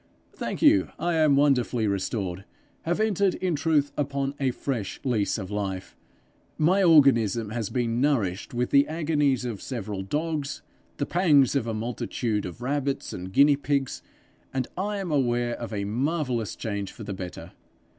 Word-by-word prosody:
'Thank - - -4
you, 305 0 +5
I 175 +1 -1
am 155 -3 +4
wonderfully 130 -5 +2
restored 100 -2 -2 0.4
have 175 +4 0
entered 200 -3 +2
in 185 -2 -1
truth 150 -1 +1
upon 140 -1 -1
a 135 -2 +2
fresh 125 -4 -3
lease 115 -6 0
of 95 -2 -6
life. 95 -2 -4 0.6
My 180 +6 +3
organism 120 - +4
has 115 -3 -3
been 120 -1 -1
nourished 110 -10 0
with 120 0 -1
the 140 0 +5
agonies 150 -5 +1
of 115 -5 -4
several 105 -6 -4
dogs, 150 +6 -3 0.3
and - - -36
the 145 - -1
pangs 150 -8 +4
of 125 -4 0
a 115 - -2
multitude 110 -2 -2
of 115 +7 -9
rabbits 140 +1 -2
and 90 +1 -6
guinea 140 +7 +6
pigs, 140 -2 -1 0.5
and 130 -2 -2
I 205 +3 -2
am 190 -4 -4
aware 120 -4 +1
of 120 -1 -6
a 100 -2 -2
marvellous 125 - -1
change 100 -3 -4
for 110 - -10
the 100 - -5
better. 90 -2 -7
130 Hz, 165 wpm, -26 LUFS, 110-150 Hz, 0.6 s, guinea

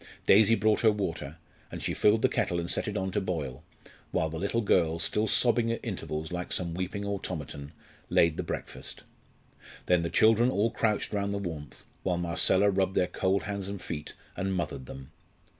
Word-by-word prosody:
Daisy 110 +2 +6
brought 110 -1 +2
her 110 - +5
water, 85 -7 -4 0.3
and - - -5
she - - -2
filled 110 +1 +3
the - - +7
kettle 85 -2 0
and 85 0 -2
set - - -1
it - - -2
on 95 0 -2
to 105 - 0
boil, 75 -7 -4 0.5
while 80 - 0
the 80 - -4
little 100 +5 0
girl, 85 -6 +2
still 105 +6 0
sobbing 120 +1 +3
at 115 - -2
intervals 75 +1 -4
like 90 0 -4
some 90 -2 0
little 85 - -6
weeping 100 +2 -3
automaton, 75 -8 -5 0.4
laid 85 -2 +4
the - - -2
breakfast. - - -6 0.8
Then 90 -1 +3
the 85 - -2
children 115 +5 +4
all 115 -2 +1
crouched 110 -1 0
round 100 -1 0
the 100 - -1
warmth, 80 -8 -6 0.2
while 90 -2 0
Marcella 90 +3 +3
rubbed 95 0 0
their - - +3
cold 95 +2 0
hands 100 -2 -4
and 100 -1 -5
feet, 75 -4 -6 0.2
and 95 0 -1
"mothered" 75 -7 -3
them. 65 +2 -10
95 Hz, 190 wpm, -29 LUFS, 80-105 Hz, 0.8 s, the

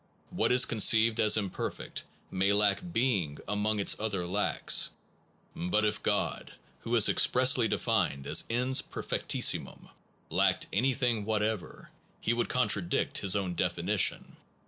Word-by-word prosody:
What - - 0
is 125 0 +5
conceived 115 +1 +3
as 105 0 +5
imperfect 100 -4 -5 0.3
may 95 +2 +1
lack 100 -1 +2
being 100 - -1
among 105 +1 -1
its 100 - +2
other 100 -5 -3
lacks, 100 +4 +1 0.7
but 105 +5 -1
if 105 0 -2
God, - - -2 0.3
who 120 +1 -3
is 110 -3 +5
expressly 125 -2 +3
defined 70 -9 -1
as - - +2
Ens 125 +3 +1
perfectissi - - 0
mum, - - -15 0.4
lacked - - +1
anything 120 -1 0
whatever, 105 -2 -4 0.3
he 115 - -1
would 120 0 -2
contradict 100 -8 0
his 95 0 +1
own 95 -3 -2
definition. - - -1
105 Hz, 130 wpm, -29 LUFS, 100-120 Hz, 0.7 s, is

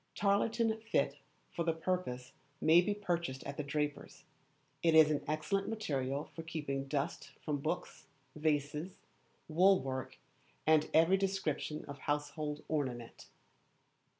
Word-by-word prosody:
Tarlatan 220 +2 +2
fit 225 0 0 0.3
for 170 - -2
the 165 -1 +1
purpose 160 -7 -2 0.3
may 165 +2 +6
be 205 +3 0
purchased 170 -9 -2
at 140 - -5
the - - 0
draper's. 145 0 -3 0.6
It 165 -1 +4
is 155 -1 +8
an 145 - 0
excellent 195 +6 0
material 140 -10 -2
for 165 - -6
keeping 150 -4 -3
dust 140 0 -2
from 145 -2 0
books, - - -4 0.3
vases, 150 +3 -1 0.5
wool 185 +4 +5
work, 130 -1 -4 0.5
and 155 -1 +4
every 165 +4 +5
description 190 -6 -2
of 140 -1 -8
household 150 +1 -2
ornament. 130 -6 -3
155 Hz, 125 wpm, -34 LUFS, 145-180 Hz, 0.6 s, is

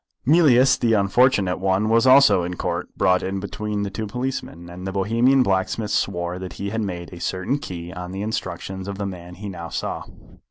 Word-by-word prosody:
Mealyus 135 -4 +5
the 115 -2 +2
unfortunate 100 -2 +3
one 95 +2 +1
was 115 +3 +3
also 135 -6 +7
in 90 +1 -4
Court, - - -3
brought 90 0 +3
in 95 +1 -3
between 105 +1 -3
two 110 +2 -4
policemen, 125 -7 -4
and 90 +2 -8
the - - -2
Bohemian 115 +7 +3
blacksmith 100 +1 -1
swore 90 -1 -1
that 95 -1 -7
he 100 0 -5
had 110 0 -1
made 90 -4 -5
a 85 - -9
certain 95 +12 -2
key 90 - -7
on 90 -1 -7
the 95 +2 -4
instructions 95 -2 -4
of 100 -1 -5
the 100 - -3
man 90 -2 -7
he 105 +3 -8
now 85 -4 -7
saw. - - -3
100 Hz, 195 wpm, -22 LUFS, 90-115 Hz, -, also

